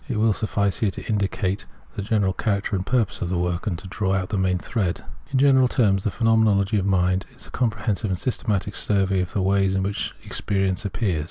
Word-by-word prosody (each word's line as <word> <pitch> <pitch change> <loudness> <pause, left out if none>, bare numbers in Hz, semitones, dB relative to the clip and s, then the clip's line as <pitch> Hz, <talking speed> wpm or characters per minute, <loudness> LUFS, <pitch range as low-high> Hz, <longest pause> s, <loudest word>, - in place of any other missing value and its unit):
It 120 - -2
will 110 0 +3
suffice 100 -2 0
here 110 - +2
to 95 - -7
indicate 100 -2 -1 0.3
the - - -4
general 100 -2 +1
character 100 0 -1
and 95 - -1
purpose 115 0 0
of 85 - -1
the 90 - 0
work, 90 +3 -1
and 90 -5 -1
to 95 - -10
draw 95 +1 -1
out 95 -1 -2
the 105 - -2
main 90 -1 +2
thread.* 95 -2 -2 0.3
In 135 - +1
general 130 -1 +5
terms, 100 -6 +2
the - - +1
Phenomenology 110 -2 +2
of 95 - -1
Mind 90 -1 +1
is - - -11
a - - -14
com 125 - +1
prehensive 105 0 -2
and 95 -3 -1
systematic 105 -3 -1
survey 95 -2 +1
of 90 - -5
the 100 - 0
ways 95 0 +2
in 95 - +1
which 100 +2 -3
experience 95 -1 -1
appears. 95 -4 -1
100 Hz, 225 wpm, -23 LUFS, 95-110 Hz, 0.3 s, general